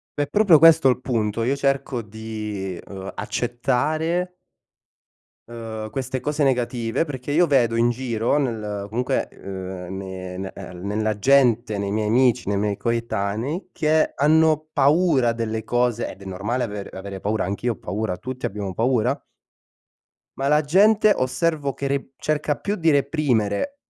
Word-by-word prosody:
È 145 - 0
proprio 185 +1 +5
questo 160 -3 +7
il 125 - -1
punto, 115 -3 -1
io 130 +4 +1
cerco 135 -3 -1
di 105 -3 -6
ehm, 95 +1 -8
accettare 155 +9 -1 1.2
ehm, 110 -2 -6
queste 130 +1 -3
cose 150 +3 0
negative, 120 -1 0
perché 140 -2 -5
io 175 +4 +4
vedo 125 -6 +3
in 120 +1 +3
giro 120 +1 0
nel 105 -7 -3
comunque 125 +4 -1
ehm, 95 -1 -7
ne 95 -1 -6
ne 95 0 -5
ehm, 90 +1 -8
nella 110 +1 -1
gente, 120 -4 +3
nei 100 0 -2
miei 105 0 0
amici, 120 -1 +2
nei 100 - +1
miei 105 0 0
coetanei 115 - -2
che 155 0 +2
hanno 155 +1 +3
paura 140 -4 +3
delle 110 -1 -3
cose- 120 0 0
ed 100 - -11
è - - -10
normale 105 +7 -2
aver 105 -2 -6
avere 95 0 -7
paura- 105 +3 -1
anch'io 100 +6 -1
ho - - -9
paura- 95 +2 -3
tutti 130 +4 -5
abbiamo 100 -1 -4
paura- 125 +4 +1 1.2
ma 135 +1 0
la 150 +1 +4
gente 205 +7 +5
osservo 140 +2 -1
che 140 - -4
re 140 -1 -2
cerca 150 0 -1
più 205 +1 -3
di 165 -3 +2
reprimere 140 - +1
120 Hz, 150 wpm, -23 LUFS, 105-145 Hz, 1.2 s, questo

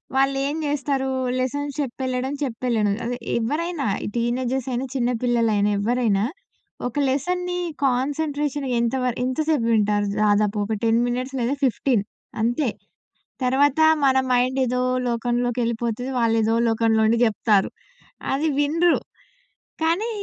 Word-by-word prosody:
వాళ్ళేం 275 +1 +1
జేస్తారూ, 275 -2 -1 0.3
లెసన్స్ 285 +3 -2
చెప్పెళ్ళడం, 260 0 -3
చెప్పెళ్ళడం. 230 -4 0
అదే, 245 +1 -2 0.2
ఎవ్వరైనా 305 +5 -2 0.2
ఈ - - -3
టీనేజర్సయినా, 250 +1 -1
చిన్న 245 -1 +1
పిల్లలైనా, 225 -4 +2
ఎవ్వరైనా 215 -2 +1 0.6
ఒక 250 - -3
లెసన్‌ని 360 +6 -1 0.3
కాన్సంట్రేషన్ 285 +2 -1
ఎంత 235 +2 0
వర 250 - +1
ఎంత 255 +2 -2
సేపు 285 -8 +2
వింటారు 210 -2 +2 0.2
దాదాపు, 210 0 +2
ఒక 220 - -2
10 230 0 +3
మినిట్స్ 255 +2 -3
లేదా 245 +3 0
15 245 -3 +1 0.4
అంతే. 240 +4 +1 0.7
తరవాతా 280 +4 +3 0.2
మన 265 -1 +4
మైండేదో 250 0 +1 0.3
లోకంలోకెళ్ళిపోతది. 240 0 -1
వాళ్లేదో 225 -1 +2
లోకంలో 225 -1 +2
ఉండి 230 +1 +3
జెప్తారు. 210 -3 +2 0.6
అది 290 +4 0
వినరు, 330 +4 +3 0.8
కానీ 350 +8 +1
250 Hz, 115 wpm, -23 LUFS, 230-275 Hz, 0.8 s, మన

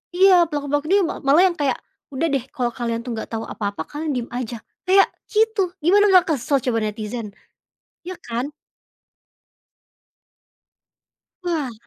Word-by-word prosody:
iya 370 -1 +6
pelaku-pelaku 290 -1 -1
ini 405 - +6
ma - - -5
malah 285 +6 +5
yang 345 - -5
kayak, 275 -3 +1 0.4
"Udah 280 +5 0
deh, 275 - +1
kalau 245 -2 -1
kalian 230 -1 -2
tuh 250 - -4
nggak 220 - -6
tau 225 0 -3
apa-apa, 200 -6 -4
kalian 300 +1 -4
diem 245 -1 -3
aja" 245 -1 -4 0.3
kayak 390 +1 +7 0.3
gitu, 435 -4 +2
gimana 405 +5 +5
malah 370 -1 +6
kesel 285 -2 +1
coba 230 -2 0
netizen, 215 0 -4 0.8
iya 370 -1 -6
kan? 245 +5 -4 2.9
Wah. 315 -8 -1
280 Hz, 140 wpm, -22 LUFS, 235-350 Hz, 2.9 s, kayak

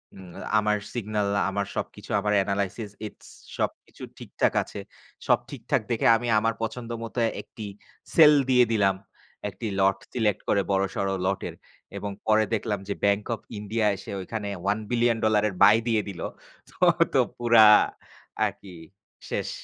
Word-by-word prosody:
উম 95 -2 -12 0.3
আমার 105 0 +1 0.2
সিগনাল 105 -3 -1 0.2
আমার 100 +1 -2
সবকিছু - - -6
আমার 105 +1 0
এনালাইসিস, 100 +2 -2 0.2
ইটস - - -15 0.3
সবকিছু - - -4
ঠিকঠাক - - -1
আছে। - - -9 0.5
সব - - +4
ঠিকঠাক - - -1
দেখে 115 - 0
আমি 120 +1 -5
আমার 115 +1 0
পছন্দ 115 +1 -5
মতো 115 +2 -5 0.2
একটি 110 - -10 0.5
সেল 155 -2 +8 0.2
দিয়ে 125 -1 +5
দিলাম। 100 -3 +3 0.5
একটি 100 +4 -6
লট 95 0 +3 0.2
সিলেক্ট 105 -5 0
করে 100 - +3
বড়সড় 95 0 0 0.2
লটের 95 +1 -2 0.4
এবং 100 -1 -4
পরে 110 0 +4
দেখলাম 105 -2 -1
যে 100 - -1
Bank 100 +1 +2
of - - -17 0.2
India 105 +1 -1
এসে 95 - -9
ওইখানে 105 +2 -5 0.2
$1,00,00,00,000 110 +1 +1
এর 95 - -9
বাই 105 +2 +8
দিয়ে 110 -2 +2
দিল। 95 - -8 0.5
তো - - -20 0.3
ঐতো - - +3 0.2
পুরা 120 -2 +6 0.8
আরকি? 95 -3 -6 0.5
শেষ! - - -2
105 Hz, 145 wpm, -26 LUFS, 100-115 Hz, 0.8 s, সেল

